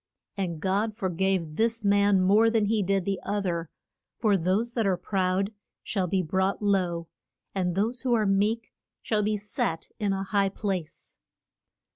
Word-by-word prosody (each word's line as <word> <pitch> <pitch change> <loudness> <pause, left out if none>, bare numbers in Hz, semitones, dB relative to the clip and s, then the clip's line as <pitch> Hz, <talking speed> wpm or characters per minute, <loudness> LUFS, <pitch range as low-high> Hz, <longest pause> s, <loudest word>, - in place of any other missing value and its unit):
And 175 -5 -3
God 200 +5 0
for 190 -5 -1
gave 180 -3 -1
this 225 -1 +1
man 200 -1 +4
more 210 +5 +5
than 225 -2 +2
he 215 +1 +1
did 195 -1 0
the 195 -1 -1
oth 205 0 -2
er, 170 -2 -2 0.5
for 215 -3 +3
those 195 +7 0
that 225 -4 +1
are 185 -2 +2
proud 190 +2 0 0.3
shall 190 -4 -1
be 185 +1 +1
brought 190 +4 0
low, 180 -5 0 0.5
and 180 -3 -1
those 225 +6 0
who 250 -2 +2
are 215 -2 +2
meek 210 +4 +1 0.3
shall 215 -2 +1
be 210 +1 0
set 200 -5 -3
in 205 -2 +1
a 195 0 -1
high 195 0 +1
place. 190 -5 -5
195 Hz, 170 wpm, -27 LUFS, 185-210 Hz, 0.5 s, more